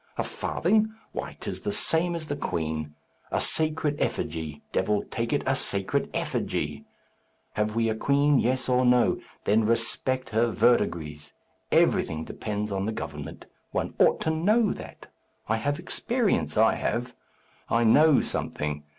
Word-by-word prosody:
A - - 0
farthing! 220 +4 0 0.2
Why, - - -6
'tis - - -5
the - - -2
same 170 +2 +1
as 165 -2 -5
the 145 -2 -3
queen. 80 - -3 0.3
A - - 0
sacred 155 -2 +1
effigy! 75 -2 -3
Devil 105 +2 +1
take 115 -1 -3
it! 145 - +1
a 135 - +2
sacred 100 -7 0
effigy! - - -2 0.7
Have 105 +1 -1
we 115 0 +2
a 110 - +1
queen 140 +4 +3
yes 130 +1 0
or 125 0 +3
no? 125 -1 +4 0.2
Then 110 +2 +3
respect 115 +3 +1
her 115 +2 +2
verdigris! 80 -11 +1 0.4
Everything 80 0 +2
depends 105 -1 -4
on 95 +1 -1
the - - 0
government; 110 - -7 0.2
one - - -2
ought - - +5
to 160 - +1
know 205 +7 +2
that. - - -10 0.4
I 110 - +1
have 145 +6 -1
experience, 210 - -1
I 110 +1 +5
have. 120 +2 -2 0.6
I 115 0 +3
know 150 +6 +6
something. 75 0 -3
120 Hz, 150 wpm, -27 LUFS, 105-150 Hz, 0.7 s, know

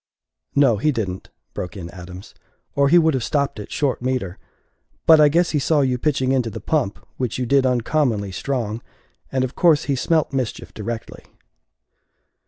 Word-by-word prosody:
"No, 135 -6 +4
he 150 +9 +2
didn't," 95 -8 -4 0.2
broke 90 +3 -6
in 85 -2 -7
Adams, 90 +1 -11 0.4
"or 140 0 +3
he 175 - +6
would 160 -2 +4
have 130 -3 -1
stopped 140 -4 -1
it 105 - -8
short 140 -4 -1
metre; 125 -8 -2 0.7
but 160 -1 +7
I 150 - +7
guess 170 +3 +2
be 150 - +1
saw 150 +1 +2
you 130 -2 0
pitching 135 -2 +1
into 125 -4 +1
the 105 - -7
pump 140 -11 -1 0.2
which 125 -3 -2
you 125 - -1
did 135 +1 +3
uncommonly 120 -5 0
strong 115 0 -3 0.5
and 130 -1 0
of 130 +1 -3
course 160 -3 +3
be 140 - 0
smelt 155 +3 +1
mischief 130 -4 -3
directly." 110 +1 -6
130 Hz, 175 wpm, -21 LUFS, 110-145 Hz, 0.7 s, but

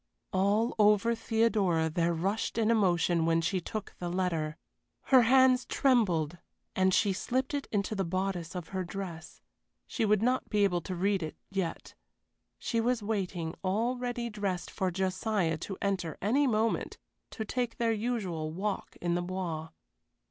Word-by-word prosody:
All 205 +5 +2
over 210 +2 +5
Theodora 220 -8 +1
there 165 +2 +1
rushed 195 +8 -1
an 225 0 +3
emotion 175 -6 +2
when 165 0 +3
she 180 +3 0
took 215 +4 -6
the 175 - -3
letter. 170 -4 -1 0.5
Her 260 -2 +6
hands 255 +1 +5
trembled, 175 - +2 0.4
and 190 0 +3
she 200 +1 +3
slipped 255 +8 -1
it 285 -1 -2
into 205 0 0
the 195 -2 0
bodice 185 -1 -2
of 175 -2 -5
her 190 -1 -2
dress. 180 -3 -7 0.4
She 235 - -2
would 210 -1 +3
not 255 +2 +1
be 210 -1 +2
able 180 -3 +2
to 185 +2 -5
read 195 +2 +1
it 155 -1 -5
yet. 190 -4 -3 0.6
She 230 -1 -1
was 240 -1 0
waiting, 185 -6 -2
all 220 +7 +1
ready 245 -1 -3
dressed, 200 -4 -3
for 190 - -1
Josiah 185 -2 0
to 195 +3 -5
enter 185 -5 -1
any 270 +8 +2
moment, 225 -1 0 0.3
to 220 - -5
take 245 +1 -2
their 230 -1 +2
usual 205 -9 -2
walk 195 +4 -3
in 175 -1 0
the 175 - 0
Bois. 175 -3 -4
195 Hz, 160 wpm, -30 LUFS, 175-225 Hz, 0.6 s, Her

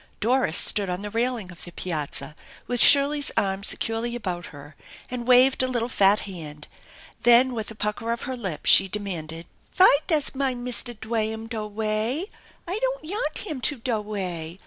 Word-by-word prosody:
Doris 240 -6 +2
stood 200 -3 +2
on 180 +2 -4
the 205 - -6
railing 230 -4 -2
of 175 - -13
the 175 - -9
piazza 150 -4 -4 0.3
with 245 -1 -2
Shirley's 285 0 +6
arm 195 0 -1
securely 225 +3 0
about 180 -7 -5
her 145 +1 -13 0.4
and 245 -1 -5
waved 255 +1 +5
a 255 - +2
little 240 -2 -2
fat 200 -3 +3
hand; 155 -6 -8 0.5
then 245 +2 +5
with 220 -3 -5
a 225 - -10
pucker 210 +2 -3
of 235 - -4
her 260 - -4
lip 195 -10 -6
she 195 - +8
demanded: 170 -5 -5 0.2
"Fy 370 -5 +5
does 310 -5 +1
mine 265 -3 -2
Mister 245 0 -2
Dwaham 220 0 -3
do 225 -2 -5
way? 220 - -2 0.4
I 375 +5 -1
don't - - -2
yanl 415 +9 -3
him 310 -10 -5
to 290 +2 0
do 230 -2 -2
way. 180 -5 -5
225 Hz, 175 wpm, -24 LUFS, 190-255 Hz, 0.5 s, she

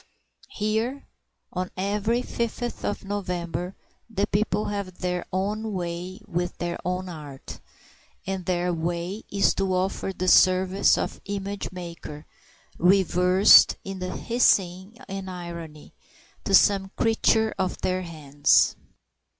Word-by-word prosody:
Here 220 +6 -2 0.5
on 185 0 -2
every 210 +5 0
fifth 235 +1 -3
of 205 - -2
November 180 -2 -3 0.3
the 205 -2 0
people 210 0 0
have 200 -3 -4
their 180 -1 -2
own 210 +3 -2
way 180 +2 -5
with 175 -3 -3
their 175 0 -3
own 180 +1 -2
art; 150 -6 -9 0.7
and 190 -1 -4
their 180 -1 0
way 170 +5 -3
is 200 0 +3
to 190 -1 0
offer 190 +1 -1
the 185 -1 -4
service 185 +1 +5
of - - -3
the 200 - -5
image 200 0 -4
maker, 170 -4 -8 0.5
reversed 185 +1 +6
in 195 -1 -6
hissing 190 0 +1
and 195 0 -5
irony, 170 -4 -8 0.5
to - - +4
some 195 -2 +4
creature 220 -1 +2
of 185 -1 -1
their 185 0 0
hands. 150 -5 +2
185 Hz, 120 wpm, -25 LUFS, 175-200 Hz, 0.7 s, reversed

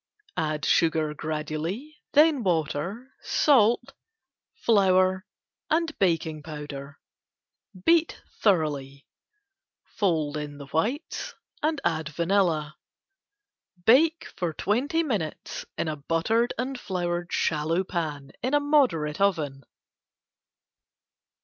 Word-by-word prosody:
Add 155 -2 -1
sugar 160 -2 +2
gradually, 155 - -4
then 300 -2 +5
water, 180 - -2
salt, 240 -6 +3 0.6
flour 190 -3 +3 0.4
and 320 0 +1
baking 165 -4 +1
powder. 145 -2 -8 0.9
Beat 335 -1 +3 0.2
thoroughly. 145 -8 0 0.8
Fold 155 -7 0
in 145 -1 -6
whites 165 - -2 0.3
and 310 -1 0
add 160 -2 0
vanilla. 165 -2 +1 1.1
Bake 315 +8 +4 0.2
twenty 280 +10 +1
minutes 205 - -3
in - - -1
a 155 -1 -2
buttered 165 +11 +1
and 255 +2 -3
floured 175 -3 -3
shallow 160 +3 +1
pan 150 -7 -4
in 255 +3 -1
moderate 250 - +2
oven. 155 -9 +1
175 Hz, 85 wpm, -26 LUFS, 155-240 Hz, 1.1 s, then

